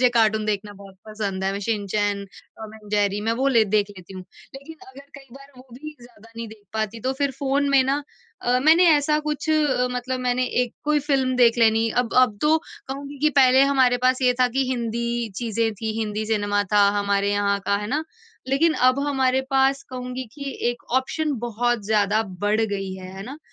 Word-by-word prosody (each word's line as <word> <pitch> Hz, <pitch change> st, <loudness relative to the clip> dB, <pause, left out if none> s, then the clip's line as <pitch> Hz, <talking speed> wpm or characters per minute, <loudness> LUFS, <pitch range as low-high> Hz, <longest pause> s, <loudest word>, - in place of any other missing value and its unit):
मुझे 250 Hz, -, +5 dB
कार्टून 220 Hz, -1 st, +3 dB
देखना 205 Hz, -1 st, -3 dB
बहुत 195 Hz, -1 st, -14 dB
पसंद 200 Hz, -3 st, -4 dB
है। 195 Hz, -, 0 dB
मैं 200 Hz, -, -4 dB
शिनचैन, 205 Hz, -1 st, -1 dB, 0.3 s
टॉम 220 Hz, -1 st, -10 dB
एंड 210 Hz, -1 st, -14 dB
जेरी, 205 Hz, -1 st, +1 dB
मैं 225 Hz, +2 st, 0 dB
वो 260 Hz, +4 st, -1 dB
ले 230 Hz, -4 st, +4 dB
देख 205 Hz, 0 st, 0 dB
लेती 185 Hz, +1 st, -12 dB
हूँ। 185 Hz, -, -8 dB, 0.3 s
लेकिन 280 Hz, +4 st, -10 dB
अगर 275 Hz, +2 st, -13 dB
कई 270 Hz, -, -17 dB
बार 275 Hz, 0 st, -13 dB
वो 255 Hz, +1 st, -15 dB
भी 305 Hz, +5 st, -9 dB
ज़्यादा 235 Hz, -2 st, -17 dB
नहीं 230 Hz, -1 st, -6 dB
देख 215 Hz, -1 st, -14 dB
पाती, 220 Hz, +1 st, -3 dB
तो 260 Hz, +3 st, -1 dB
फिर 280 Hz, -, +2 dB
फ़ोन 280 Hz, +1 st, 0 dB
में 270 Hz, -1 st, +5 dB
ना 280 Hz, +2 st, 0 dB, 0.4 s
अ, 245 Hz, +1 st, +1 dB
मैंने 325 Hz, +6 st, +5 dB
ऐसा 300 Hz, +1 st, +1 dB
कुछ 300 Hz, 0 st, -3 dB
अ, 295 Hz, -5 st, +2 dB
मतलब 250 Hz, +1 st, -3 dB
मैंने 250 Hz, 0 st, 0 dB, 0.2 s
एक 245 Hz, -2 st, -5 dB
कोई 300 Hz, 0 st, +2 dB
फ़िल्म 265 Hz, -3 st, 0 dB
देख 240 Hz, -1 st, +4 dB
लेनी। 225 Hz, 0 st, +3 dB
अब 245 Hz, 0 st, -1 dB
अब 215 Hz, -5 st, +1 dB
तो 310 Hz, +1 st, +4 dB, 0.3 s
कहूँगी 280 Hz, +1 st, -7 dB
कि 305 Hz, +2 st, +2 dB
पहले 260 Hz, 0 st, +6 dB
हमारे 265 Hz, -3 st, +3 dB
पास 255 Hz, +1 st, +2 dB
ये 250 Hz, -1 st, +4 dB
था 250 Hz, -, +4 dB
कि 265 Hz, +2 st, 0 dB
हिंदी 235 Hz, -1 st, -2 dB
चीज़ें 230 Hz, -1 st, -1 dB
थीं, 220 Hz, +2 st, -4 dB
हिंदी 215 Hz, -1 st, -2 dB
सिनेमा 205 Hz, -2 st, 0 dB
था 205 Hz, -1 st, +5 dB
हमारे 200 Hz, 0 st, 0 dB
यहाँ 200 Hz, 0 st, +1 dB
का, 200 Hz, -, +2 dB
है 210 Hz, +1 st, -4 dB
ना? 295 Hz, +8 st, -2 dB, 0.4 s
लेकिन 310 Hz, +5 st, +2 dB
अब 255 Hz, +1 st, +3 dB
हमारे 265 Hz, -2 st, +1 dB
पास, 270 Hz, 0 st, +2 dB
कहूँगी 250 Hz, 0 st, -5 dB
कि 280 Hz, -2 st, -6 dB, 0.2 s
एक 240 Hz, -, -9 dB
ऑप्शन 295 Hz, +4 st, 0 dB
बहुत 240 Hz, 0 st, -1 dB
ज़्यादा 210 Hz, 0 st, +2 dB, 0.2 s
बढ़ 210 Hz, +2 st, +2 dB
गई 200 Hz, -3 st, -2 dB
है। 185 Hz, -1 st, -9 dB
है 195 Hz, -, -7 dB
ना? 270 Hz, +8 st, -9 dB
240 Hz, 205 wpm, -23 LUFS, 210-270 Hz, 0.4 s, पहले